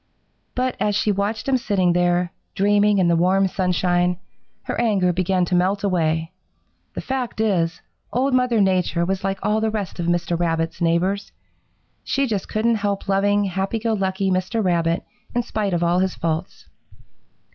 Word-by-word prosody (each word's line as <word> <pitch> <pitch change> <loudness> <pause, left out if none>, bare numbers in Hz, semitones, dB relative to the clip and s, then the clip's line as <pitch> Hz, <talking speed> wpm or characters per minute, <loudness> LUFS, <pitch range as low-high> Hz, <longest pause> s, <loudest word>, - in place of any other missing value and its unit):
But 255 0 0
as 210 -1 +1
she 210 +1 +2
watched 205 +3 -2
him 270 -1 +3
sitting 190 -7 +1
there, 175 0 +1 0.2
dreaming 205 +1 +3
in 185 -2 +3
the 170 - +3
warm 190 +3 +3
sunshine, 180 -1 +1 0.5
her - - -2
anger 195 -6 +2
began 185 +1 +1
to 180 - -4
melt 190 +3 +1
away. 165 -3 0 0.6
The - - -3
fact 260 -4 -3
is, 180 -6 0 0.3
Old 265 +2 +1
Mother 250 -3 +2
Nature 185 -3 +2
was 190 +1 -2
like 195 0 -1
all 215 +1 +1
the 220 - +1
rest 210 -4 -4
of 170 - -2
Mr. 175 0 0
Rabbit's 165 -1 -1
neighbors 180 +4 0 0.7
she 275 - 0
just 210 -6 -3
couldn't 225 +1 +1
help 200 -1 -2
loving 205 +1 +2
happy 195 +3 -2
go 225 0 -1
lucky 190 -1 0
Mr. 185 +5 0
Rabbit 170 -1 +1 0.3
in 240 - +1
spite 215 -4 -2
of 175 -1 0
all 175 +1 +2
his 190 0 0
faults. 165 +2 -3
190 Hz, 170 wpm, -22 LUFS, 175-210 Hz, 0.7 s, him